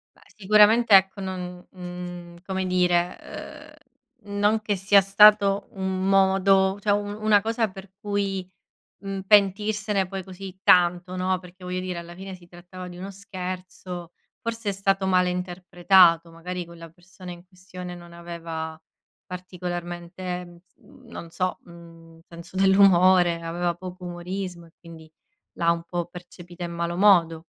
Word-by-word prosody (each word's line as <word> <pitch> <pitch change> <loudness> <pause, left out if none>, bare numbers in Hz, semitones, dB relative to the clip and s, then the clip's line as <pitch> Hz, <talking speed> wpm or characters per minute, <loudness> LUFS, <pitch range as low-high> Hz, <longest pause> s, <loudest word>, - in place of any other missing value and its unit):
Beh - - -25
sicuramente 215 +2 +5
ecco, 190 +1 +3
non, 180 -1 -6
mhmm, 175 -1 -8
come 190 -1 -2
dire, 180 -1 +1 1.0
ehm, 205 0 -6
non 210 +2 +2
che 210 -1 -1
sia 195 +1 +4
stato 200 0 +5
un 190 -2 -3
modo, 195 0 +3
cioè 205 - +1
un 205 0 -1
una 215 -1 +4
cosa 225 +1 -1
per 190 0 -12
cui, 200 -3 -2 0.5
mhmm, 195 -1 -5
pentirsene 205 0 +2
poi 190 0 -6
così 190 0 -10
tanto, 180 +1 +4
no, 185 0 0
perché 180 0 -15
voglio 180 0 -3
dire, 185 -1 -4
alla 170 0 -10
fine 190 +1 -8
si 175 -1 -18
trattava 180 +1 -11
di 175 - -10
uno 190 +2 -7
scherzo, 185 -2 -7 0.3
forse 230 -3 -3
è - - +1
stato 195 0 0
male 180 -1 +3
interpretato, 180 -1 +3
magari 180 +2 -6
quella 165 -1 -12
persona 180 +2 -13
in 175 0 -12
questione 180 -1 -10
non 175 -1 -13
aveva 165 -2 -7 0.5
particolarmente, 180 0 -6 0.3
mhmm, 255 - -20
non 170 - -9
so, 185 0 -2
mhmm, 165 -1 -15
senso 170 +2 -12
dell'umore, 185 -3 +5
aveva 170 +1 -2
poco 180 +1 -10
umorismo 175 0 -6
e - - -23
quindi 160 -2 -14 0.4
l'ha 170 0 +2
un 170 0 -2
po' 175 0 -3
percepita 175 0 -11
in 170 0 -5
malo 170 0 -3
modo. 170 -4 +4
185 Hz, 145 wpm, -24 LUFS, 175-195 Hz, 1.0 s, sicuramente